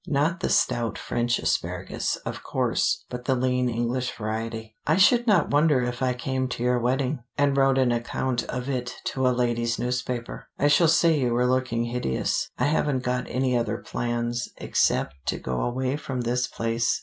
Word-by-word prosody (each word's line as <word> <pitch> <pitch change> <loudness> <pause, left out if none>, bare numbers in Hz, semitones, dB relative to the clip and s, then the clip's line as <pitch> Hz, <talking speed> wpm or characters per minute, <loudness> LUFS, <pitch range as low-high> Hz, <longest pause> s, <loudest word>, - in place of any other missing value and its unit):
Not 150 +5 +1
the - - -1
stout 115 -1 +1
French 120 0 0
asparagus, - - -1
of - - -5
course, - - 0
but 125 0 -6
the 135 - +2
lean 125 0 +1
English 120 +2 -1
variety. 110 0 -4
I 155 - +4
should 240 +5 +5
not 195 -7 +3
wonder 145 -3 +4
if 125 +1 -3
I 130 -1 +1
came 130 +1 -2
to 120 -1 -4
your 125 0 +2
wedding, 130 +3 0 0.2
and 145 -1 +3
wrote 135 -1 +3
an 130 -2 +3
account 120 +1 -1
of 125 +1 -4
it 125 -2 -3 0.2
to 130 -1 +1
a - - +5
ladies' 120 -2 0
newspaper. 125 -1 -3
I 145 - +3
shall 160 +3 +5
say 165 -1 +4
you 125 -3 +1
were 125 +1 +2
looking 125 -2 +1
hideous. 120 - -1
I - - +1
haven't 145 -3 +1
got 125 0 -1
any 130 0 0
other 115 -2 0
plans, 120 0 -2
except 65 - +1
to - - 0
go 65 -1 -3
away 130 +3 -1
from 130 -4 -4
this 125 +1 0
place. 115 0 0
125 Hz, 185 wpm, -25 LUFS, 120-135 Hz, 0.2 s, should